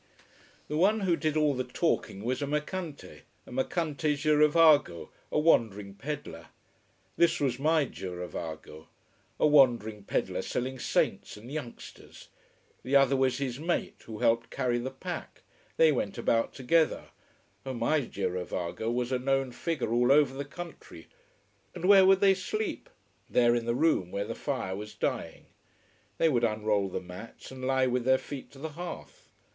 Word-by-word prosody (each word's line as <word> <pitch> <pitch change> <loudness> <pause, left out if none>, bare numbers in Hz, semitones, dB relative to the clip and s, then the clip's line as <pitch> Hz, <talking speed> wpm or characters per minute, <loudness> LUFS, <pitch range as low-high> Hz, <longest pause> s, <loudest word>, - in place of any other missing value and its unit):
The 150 - -2
one 205 +6 +3
who 180 -3 +2
did 155 -2 -1
all 150 -2 +3
the 130 -1 -2
talking 125 - -1
was 125 +4 -1
a 145 - -1
mercante, 150 +2 -4 0.2
a - - -14
mercante 150 +3 -1
girovago, 150 - +4 0.2
a - - 0
wandering 105 -10 +2
peddler. 135 - -7 0.7
This 170 -1 +3
was 130 -3 0
my 155 +1 +3
girovago: 85 - -7 0.5
a - - +4
wandering 120 -8 +4
peddler - - -1
selling 130 +1 -3
saints - - -1
and 115 +5 -11
youngsters! 140 -6 -9 0.5
The 130 +3 -1
other 135 0 +5
was 130 -1 +1
his 135 -2 -3
mate, 170 +3 -2
who 110 -2 -7
helped 115 +2 +1
carry 120 -1 -1
the 125 +2 -3
pack. 130 - -7 0.3
They 160 -1 +6
went 105 -7 -2
about 115 0 +1
together. 155 +5 +1 0.5
Oh, 130 -1 -5
my 120 +6 +1
girovago 90 0 -3
was 125 +1 -2
a 130 - +1
known 135 0 0
figure 145 -4 -2
all 120 +2 +3
over 140 -2 +4
the 140 +1 -5
country. 175 +4 -10 0.7
And 180 - -4
where 195 -1 +7
would 195 0 +5
they 195 -1 +6
sleep? 430 - -4 0.4
There, 120 -1 +4
in 120 -1 -1
the 120 - +1
room 130 - +2
where 100 +2 -3
the - - -4
fire 95 0 -3
was 105 +2 -8
dying. - - -3 0.7
They 165 - +3
would 125 -6 +1
unroll 105 -3 +1
the - - -4
mats 90 +9 -11
and 130 -1 -9
lie 130 -1 +2
with 125 -1 0
their 130 +1 +4
feet 140 0 -8
to - - -14
the 160 +4 -5
hearth. 150 - -9
130 Hz, 160 wpm, -29 LUFS, 115-150 Hz, 0.7 s, where